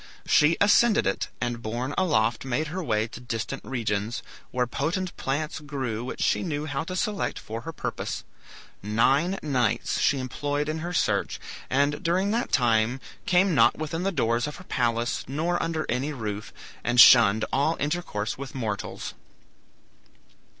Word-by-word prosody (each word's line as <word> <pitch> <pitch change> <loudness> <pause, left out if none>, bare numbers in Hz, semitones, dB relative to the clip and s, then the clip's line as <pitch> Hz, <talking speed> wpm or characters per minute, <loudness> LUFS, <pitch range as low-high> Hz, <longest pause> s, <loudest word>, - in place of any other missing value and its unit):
She 150 +3 +4
ascended 210 +2 +5
it, 100 - 0
and 120 -1 -2
borne 120 +5 -3
aloft 115 -11 +1
made 140 +4 -1
her 185 +3 -4
way 110 -5 0
to 120 - -9
distant 120 +2 -4
regions, 115 -3 -2 0.3
where 125 -1 0
potent 170 - -2
plants 150 +4 -2
grew 135 -7 -4
which 130 - -4
she - - +2
knew 150 -4 -2
how 145 0 -2
to 185 - -5
select 205 +2 -1
for 115 +1 -6
her 165 +6 -6
purpose. - - -4 0.6
Nine 135 - +2
nights 130 -6 0
she 140 - +3
employed 145 +3 -2
in 155 +1 -2
her 170 +2 -4
search, 180 - 0 0.3
and 140 +2 +1
during 185 +4 +1
that 235 +2 -1
time 120 0 +2 0.3
came 185 +1 +4
not 140 - +4
within 155 +2 -3
the 195 +2 0
doors 120 -6 +1
of 150 - -6
her - - -11
palace 120 -6 0
nor 160 +6 -1
under 160 -1 -1
any 130 +5 -1
roof, 105 -5 -5 0.3
and 120 - +1
shunned 110 -3 +8
all 145 +5 +2
intercourse 145 -9 -2
with 140 -1 -7
mortals. 110 -6 -4
135 Hz, 155 wpm, -26 LUFS, 115-160 Hz, 0.6 s, shunned